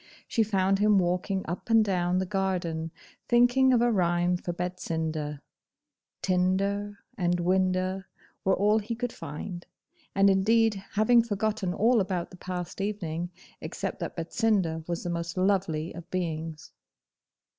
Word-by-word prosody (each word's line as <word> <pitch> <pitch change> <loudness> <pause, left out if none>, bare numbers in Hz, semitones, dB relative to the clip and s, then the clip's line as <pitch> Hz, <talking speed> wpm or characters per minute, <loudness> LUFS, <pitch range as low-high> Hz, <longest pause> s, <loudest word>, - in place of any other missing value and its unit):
She 230 - +1
found 195 -2 +2
him 210 0 +4
walking 185 +2 0
up 175 +8 -5
and 225 -1 +5
down 180 -2 +1
the 190 - +1
garden, 180 -4 -1 0.4
thinking 245 +2 +5
of 240 -2 +4
a 240 - +3
rhyme 175 -2 +2
for 175 0 -4
Betsinda 160 -4 -3 0.8
(TINDER 195 +3 +1 0.2
and 175 -1 +1
WINDA 185 +1 +1 0.4
were 190 - +3
all 210 +3 +3
he 225 +2 -4
could 245 0 -3
find), 175 +5 -7 0.5
and 195 0 +5
indeed 220 +3 +4 0.2
having 225 +3 +5
forgotten 210 -3 -1
all 225 +5 +3
about 185 -2 -2
the 180 - -12
past 180 0 -5
evening, 175 -5 -3 0.3
except - - -4
that - - -4
Betsinda 175 -2 0
was 170 -1 -3
the 175 - -2
most 170 +1 -4
lovely 185 -4 +1
of 170 +1 -10
beings. 160 -3 -4
185 Hz, 140 wpm, -28 LUFS, 175-205 Hz, 0.8 s, and